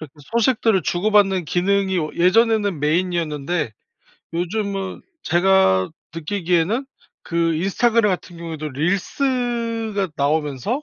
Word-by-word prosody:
이렇게 155 -4 -10 0.2
소식들을 230 -4 +2
주고받는 195 -1 +2
기능이 190 +3 +1
어 155 -2 -2
예전에는 205 0 +3
메인이었는데 155 -3 -1 0.6
요즘은 195 +2 -3 0.2
제가 175 - +3 0.2
느끼기에는 180 - 0 0.4
그 165 -1 0
인스타그램 215 +5 +2
같은 175 -1 -5
경우에도 160 -2 -5
릴스가 225 - -1
나오면서 150 - -1
185 Hz, 300 characters per minute, -21 LUFS, 165-215 Hz, 0.6 s, 예전에는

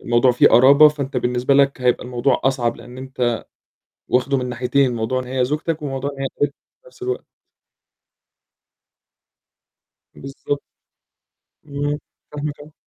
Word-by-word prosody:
الموضوع 120 +2 +3
فيه 125 - +5
قرابة 140 +6 +7
فأنت 145 -2 -5
بالنسبة 125 +2 +1
لك 140 -1 +3
هيبقى 125 0 +1
الموضوع 125 +2 0
أصعب 130 -3 +1
لإن 125 +1 -12
أنت 125 -3 -2 0.7
واخدُه 130 +2 +1
من 125 -1 -2
ناحيتين، 125 +1 +1
موضوع 115 +3 -1
إن - - -6
هي 130 0 0
زوجتك 155 +4 -2
وموضوع 140 -1 -3
إن 140 -1 -11
هي - - 0
قريبتك 145 -1 +1 0.3
في - - -26
نفس 445 - -19
الوقت. 390 +5 -3 2.9
بالضبط. 140 +1 -5 1.1
امم، 145 0 -2 0.3
فاهمك 150 0 -5
آه. 150 +1 -13
135 Hz, 135 wpm, -20 LUFS, 125-145 Hz, 2.9 s, قرابة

